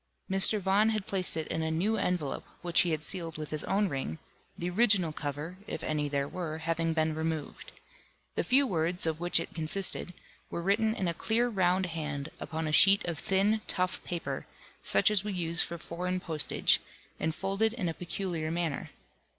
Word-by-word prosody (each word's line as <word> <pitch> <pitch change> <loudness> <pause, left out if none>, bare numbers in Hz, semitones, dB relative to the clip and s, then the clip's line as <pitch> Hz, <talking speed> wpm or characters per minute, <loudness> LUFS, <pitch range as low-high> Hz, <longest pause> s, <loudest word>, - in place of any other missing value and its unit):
Mr. 195 +3 +6
Vaughan 200 +3 +3
had 215 -3 -1
placed 185 -4 0
it 160 - -2
in 160 - -1
a 160 - -1
new 180 +8 +1
envelope, 180 -9 -1 0.2
which 175 0 +4
he 175 - +1
had 155 -2 -1
sealed 165 -2 -3
with 155 -1 -6
his 155 -1 +1
own 200 +1 +2
ring, 135 - -3 0.4
the 175 - -3
original 185 -4 +3
cover 150 +5 -4
(if - - -5
any 150 -1 -1
there 140 -1 -1
were) 160 -1 -4
having 165 0 -1
been 160 -1 +1
removed. 160 -1 -4 0.6
The - - 0
few 275 +3 +4
words, 175 -4 0
of 160 -1 -1
which 175 0 +2
it 165 - -6
consisted, 175 +2 -1 0.3
were 170 - -4
written 220 +4 +2
in 190 -6 -1
a 170 - 0
clear 230 +7 +1
round 185 -3 +2
hand, 150 -4 -4
upon 160 0 -3
a - - -1
sheet 195 +5 +7
of 170 -3 -3
thin 200 +3 +2
tough 185 0 0
paper, 175 -2 -4 0.3
such - - +4
as 205 -2 +3
we 210 -1 -3
use 170 -1 +1
for 170 - -3
foreign 180 +2 -3
postage, 160 -4 +2 0.4
and 160 0 -1
folded 195 +3 0
in 215 -7 -2
a 165 - -1
peculiar 175 -2 -3
manner. 165 -3 -2
175 Hz, 190 wpm, -30 LUFS, 160-195 Hz, 0.6 s, sheet